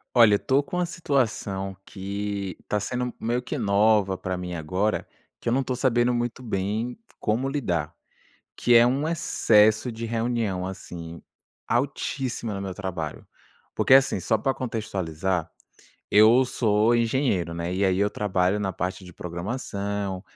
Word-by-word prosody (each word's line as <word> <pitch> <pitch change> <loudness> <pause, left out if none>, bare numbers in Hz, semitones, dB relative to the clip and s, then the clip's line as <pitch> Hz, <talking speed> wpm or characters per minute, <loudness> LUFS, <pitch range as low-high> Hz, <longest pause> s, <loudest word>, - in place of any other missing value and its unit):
Olha, 115 -4 +7
estou 135 +6 +1
com 180 +5 -5
uma 180 -1 +1
situação 115 - -1
que 100 -1 -4
está 105 - -1
sendo 125 +3 -3
meio 120 +2 -1
que 125 +4 -4
nova 100 -2 +3
para 95 0 -3
mim 90 -1 -5
agora, 90 +7 -1 0.3
que - - -10
eu 115 - +3
não 135 - +2
estou 130 -1 -2
sabendo 125 -1 +2
muito 120 0 -2
bem 110 - -2 0.2
como 120 +5 0
lidar, 90 - -1 0.6
que 120 - +3
é 115 0 +8
um 135 +5 +1
excesso 110 -7 +3
de 115 +1 -6
reunião, 115 -5 -1
assim, 85 -3 -8 0.5
altíssima 130 -3 -1
no 100 - -4
meu 95 -1 -4
trabalho. 90 -6 -5 0.5
Porque, 130 - +4
assim, 135 -6 +5
só 110 +5 +1
pra 135 +5 0
contextualizar, 95 -8 -2 0.6
eu 110 +5 +6
sou 110 -2 +2
engenheiro, 115 -7 +1
né. 85 +1 -3
E 95 +2 -1
aí 95 -1 +2
eu 100 +1 +2
trabalho 95 -1 0
na 95 -2 -1
parte 90 +3 -3
de 90 -1 -12
programação, 100 +1 -4
105 Hz, 150 wpm, -25 LUFS, 95-120 Hz, 0.6 s, é